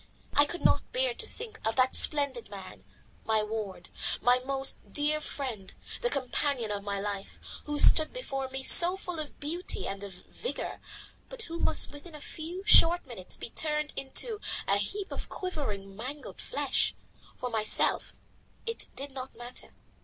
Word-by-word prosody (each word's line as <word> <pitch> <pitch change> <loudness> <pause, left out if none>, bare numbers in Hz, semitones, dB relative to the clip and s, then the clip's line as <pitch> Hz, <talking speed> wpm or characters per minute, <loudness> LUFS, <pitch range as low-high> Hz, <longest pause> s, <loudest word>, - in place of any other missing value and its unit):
I 290 - +5
could 345 - -6
not - - +2
bear - - +1
to - - -2
think 440 -2 -9
of 225 0 -1
that 255 0 +2
splendid 280 -7 -1
man, 195 -2 -10 0.4
my 220 -1 +1
ward, 210 -3 -6 0.3
my 250 +1 +3
most 270 +1 0
dear 300 +5 +2
friend, 235 -11 -6 0.3
the 485 - +1
companion 265 - -2
of 200 -1 -4
my 200 -1 -3
life, 200 -1 -5 0.3
who 295 0 -3
stood 310 +1 +6
before 270 - -5
me 265 0 -5
so 355 +6 +10
full 355 -3 -5
of 300 -2 -6
beauty 335 +5 -2
and 195 0 -6
of 195 -2 -9
vigour, 485 - -6 0.5
but - - -5
who 335 -4 -6
must - - +3
within 300 +3 -12
a - - -9
few 335 +5 -7
short 350 -4 +8
minutes 230 -8 -4
be 230 - -8
turned 300 -1 +1
into 415 - +2 0.3
a 200 - +3
heap 385 - -3
of - - -6
quivering, 210 - -5
mangled 260 +7 -8
flesh. - - 0 0.4
For 250 -1 -5
myself 215 -1 +2 0.5
it 460 0 -1
did 280 +1 -4
not 260 0 -8
matter. 240 +1 -6
275 Hz, 165 wpm, -29 LUFS, 220-335 Hz, 0.5 s, so